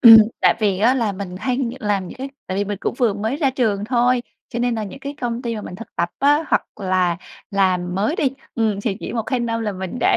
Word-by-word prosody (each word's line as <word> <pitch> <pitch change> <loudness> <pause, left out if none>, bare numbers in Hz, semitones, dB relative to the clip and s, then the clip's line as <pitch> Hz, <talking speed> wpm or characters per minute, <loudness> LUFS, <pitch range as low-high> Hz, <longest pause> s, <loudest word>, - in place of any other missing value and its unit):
Ừm, 225 -2 +12 0.2
tại - - +5
vì 200 -3 +2
á 235 +5 +4
là 230 -6 +1
mình 185 -2 -6
hay 250 +4 -1 0.2
làm 200 -3 0
những - - -10
cái 270 - -4 0.2
tại 185 - -3
vì 200 - +1
mình 205 -1 -3
cũng - - -1
vừa 235 -5 +3
mới 220 +6 -1
ra 280 -3 +2
trường 220 -6 0
thôi, 245 +1 +2 0.3
cho 235 - -4
nên 240 0 +1
là 220 -1 -2
những 205 +6 -8
cái 280 +1 -6
công 240 0 -2
ty 235 -2 -2
mà 210 - -5
mình 180 - -7
thực 230 +5 -9
tập 170 - +1
á, 290 +3 +4
hoặc - - +2
là 185 -3 +2 0.3
làm 185 -3 +1
mới 210 - +1
đi, 275 - +2 0.2
ừm 215 -3 +1
thì 200 -2 -1
chỉ - - -5
1-2 240 +2 -1
năm 230 -1 -1
là 210 -2 -1
mình 190 +3 -5
đã - - +4
220 Hz, 260 wpm, -21 LUFS, 195-245 Hz, 0.3 s, Ừm